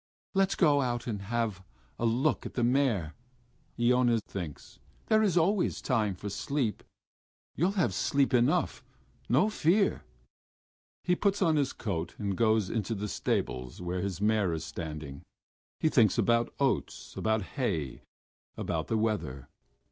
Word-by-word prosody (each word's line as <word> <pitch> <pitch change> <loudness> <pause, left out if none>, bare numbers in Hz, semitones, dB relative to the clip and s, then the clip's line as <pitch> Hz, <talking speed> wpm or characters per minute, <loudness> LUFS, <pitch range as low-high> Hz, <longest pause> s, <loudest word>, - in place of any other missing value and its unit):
"Let's 195 0 +2
go 145 -5 +4
out 120 -2 -2
and 105 -4 -3
have 110 -2 -2 0.4
a 115 - +2
look 120 +4 +1
at - - -12
the 120 - +1
mare," 120 - +1 0.7
Iona 120 -1 +3
thinks. 85 -7 -7 0.3
"There 220 0 +5
is 195 -5 +2
always 180 +3 +2
time 110 -7 0
for 100 - -7
sleep.... 135 -3 -2 0.7
You'll 180 +6 +1
have 185 -5 +1
sleep 140 -2 +1
enough, 120 0 +2 0.5
no 140 - +4
fear...." 200 -1 +2 1.0
He 180 - +2
puts 200 +1 +1
on 160 -3 +3
his 140 -3 +1
coat 85 -6 -4
and 100 -2 -2
goes 110 -1 +2
into 110 +1 -2
the 105 +1 -3
stables 65 -9 -2
where 90 0 -3
his 95 -2 -3
mare 105 -4 +2
is 80 0 -4
standing. 75 -4 -6 0.6
He - - +2
thinks 115 - +4
about 115 0 +2
oats, 135 -2 -1
about 110 -1 0
hay, 85 - -2 0.6
about 80 -1 -2
the 110 - 0
weather.... 105 - -2
115 Hz, 145 wpm, -30 LUFS, 95-140 Hz, 1.0 s, There